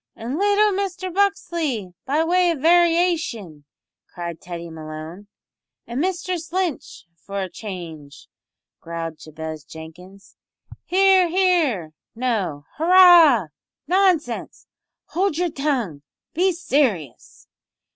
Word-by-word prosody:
"An' 245 +8 -5
little 410 +1 +3
Mister 375 -1 -3
Buxley, 335 - -1
be 295 +4 +2
way 355 +2 +2
of 335 - 0
variashun," 330 - +1 0.5
cried 170 -2 -7
Teddy 170 -1 -7
Malone. 160 +4 -9 0.6
"An' 235 +2 -5
Mistress 360 -1 -2
Lynch, 360 - -3
for 200 +4 -7
a 190 - -2
change," 165 -9 -9 0.5
growled 165 -1 -6
Jabez 155 -1 -8
Jenkins. 180 +6 -13 0.5
"Hear, 380 0 +4
hear! 325 - +1 0.2
No, 250 +2 -1
no! 155 -8 -4
Hurrah! 335 - +7 0.4
Nonsense! 355 -9 0 0.5
Howld 360 -1 0
yer 355 0 0
tongue! 260 - -2 0.3
Be 370 +3 +2
serious!" 260 - -2
275 Hz, 105 wpm, -22 LUFS, -, 0.6 s, Hurrah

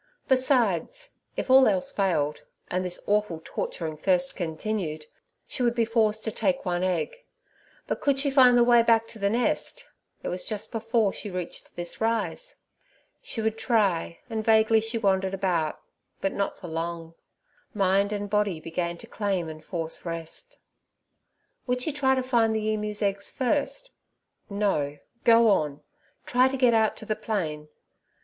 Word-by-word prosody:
Besides, 255 - +1 0.3
if - - -1
all 265 0 +8
else 190 -4 0
failed, 160 -7 0 0.3
and 185 +1 0
this 180 -1 -3
awful 205 -5 +1
torturing 160 -2 -4
thirst 180 +2 +1
continued, 160 -2 -3 0.4
she - - -4
would 240 -1 +2
be 230 -1 +2
forced 220 -1 +1
to 220 - -2
take 275 +3 0
one 175 -1 0
egg; 185 - -1 0.7
but - - -3
could 280 -2 +2
she 280 +1 +2
find 255 -3 +7
the 240 - +6
way 240 -1 +6
back 230 -1 +3
to 220 - -11
the 200 0 +2
nest? 245 - 0 0.4
it - - -2
was 180 - -3
just 215 -2 -3
before 225 -2 +1
she 210 - -5
reached 180 -2 -6
this 175 +3 -6
rise. 230 - -1 0.7
She 380 - -4
would 220 0 -1
try, 195 -8 +1
and 220 -2 -3
vaguely 220 0 +4
she 225 +1 -2
wandered 195 -3 +1
about, 175 -5 0 0.4
but 195 - -1
not 200 - -2
for 180 - -9
long—mind 170 +4 -3
and 205 -1 -2
body 205 -4 0
began 170 +1 -3
to - - -11
claim 195 -5 -1
and 155 0 -9
force 165 -1 -4
rest. 165 - -5 1.1
Would 250 0 0
she 310 - -1
try 265 -2 +2
to 260 - 0
find 230 -3 +2
the 215 0 0
emu's 210 0 -3
eggs 200 0 -1
first? 295 - -1 0.6
No, 195 -9 0 0.3
go 230 0 +7
on; 150 -7 +1 0.4
try 250 +1 +4
to 270 +1 -2
get 250 -2 +4
out 220 -1 +2
to - - -8
the 215 - -1
plain. 155 -10 -3
210 Hz, 160 wpm, -26 LUFS, 180-235 Hz, 1.1 s, all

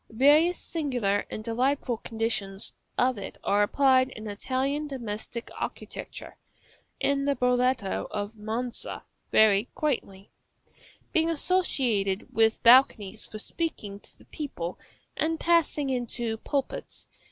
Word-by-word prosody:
Various 295 +9 +5
singular 245 -11 -1
and 215 - -5
delightful 250 +2 0
conditions 220 -3 -2 0.2
of 250 -3 +2
it 195 - -7
are 205 +1 +3
applied 260 +4 +4
in 215 -3 -9
Italian 265 +8 -1
domestic 235 -3 -5
architecture - - -6 0.6
(in 280 0 +1
the 280 0 +2
Broletto 250 -4 +1
of 205 +1 -4
Monza 225 +3 -4 0.3
very 210 -1 +5
quaintly), 200 -10 -2 0.8
being 325 -2 +3
associated 260 - 0
with 225 0 +3
balconies 230 -4 +5
for 215 - -8
speaking 210 -6 -4
to - - -17
the - - -19
people, 185 - -5 0.4
and 320 0 0
passing 320 -4 +2
into 240 -2 -2
pulpits. 275 +3 -4
245 Hz, 115 wpm, -27 LUFS, 215-280 Hz, 0.8 s, Various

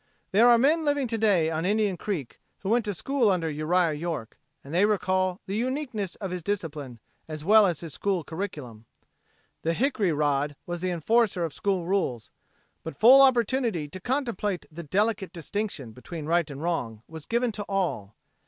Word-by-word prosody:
There 220 +5 +6
are 240 - +7
men 305 +7 +3
living 290 -2 +1
to 225 - -1
day 185 -7 +3
on 160 0 -2
Indian 205 0 +1
Creek 175 - -5 0.2
who 195 - -3
went 230 0 +2
to 205 - -1
school 265 +3 +1
under 180 -4 +1
Uriah 160 +2 +1
York, 150 -7 -5 0.2
and 140 - -10
they 180 +3 +3
recall 185 -3 +1
the 195 0 -4
uniqueness 245 - -2
of 195 -4 -6
his 180 -1 -4
discipline 155 - -4 0.3
as 155 -1 -7
well 210 +1 +7
as 170 -5 -2
his 165 -4 -7
school 195 -4 -1
curriculum. 145 - -7 0.7
The 165 +1 0
hickory 220 - +1
rod 145 -1 0
was 175 -1 -5
the 185 - -1
enforcer 185 +2 +1
of 160 - -6
school 190 -4 -1
rules, 170 - -1 0.5
but 160 - -7
full 255 +5 +8
opportunity 240 - +2
to 185 - -8
contemplate 230 -5 -2
the 165 +2 -7
delicate 200 +5 0
distinction 170 - -4
between 150 +7 -8
right 165 0 +1
and 140 +2 -7
wrong 120 -11 -2
was 160 -2 -10
given 235 +1 +1
to 210 -1 -5
all. 165 - -2
185 Hz, 180 wpm, -26 LUFS, 155-215 Hz, 0.7 s, full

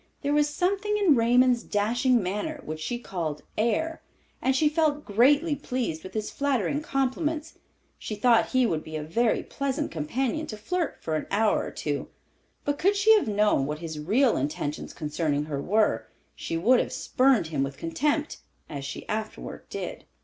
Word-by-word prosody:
There 285 +1 +1
was 295 0 +3
something 400 +7 0
in 395 -7 +5
Raymond's 245 0 +4
dashing 235 +3 +1
manner, 210 - -3
which 155 0 -5
she 200 +10 -3
called 165 -10 -4
"air," 235 +9 0 0.4
and 265 0 +2
she 300 +3 +4
felt 300 -1 +1
greatly 285 +9 +4
pleased 250 - -3
with 185 +3 -10
his 215 -1 -2
flattering 280 0 0
compliments. 300 +3 -2 0.4
She 215 - -5
thought 230 +2 +4
he 255 -1 +2
would 160 -8 -1
be 155 - -8
a 155 - -3
very 225 +9 +1
pleasant 280 +2 -2
companion 250 - -2
to 215 - -6
flirt 335 +10 -2
with - - -29
for 160 - -1
an - - -5
hour 215 +1 +2
or - - -5
two; - - -3 0.6
but 290 0 -1
could 395 +4 +3
she 415 +2 +6
have 425 - +3
known 210 -9 +2
what 150 +1 -3
his 160 -1 -6
real 225 - +3
intentions 145 +2 -3
concerning 150 -1 -1
her 145 -2 -3
were 180 - +1 0.3
she 165 - -3
would 240 +9 +4
have - - -1
spurned 260 -6 +2
him 150 -4 -1
with 135 0 -2
contempt—as 275 - -3
she 140 - -6
afterward 215 0 -5
did. - - -6
235 Hz, 175 wpm, -27 LUFS, -, 0.6 s, she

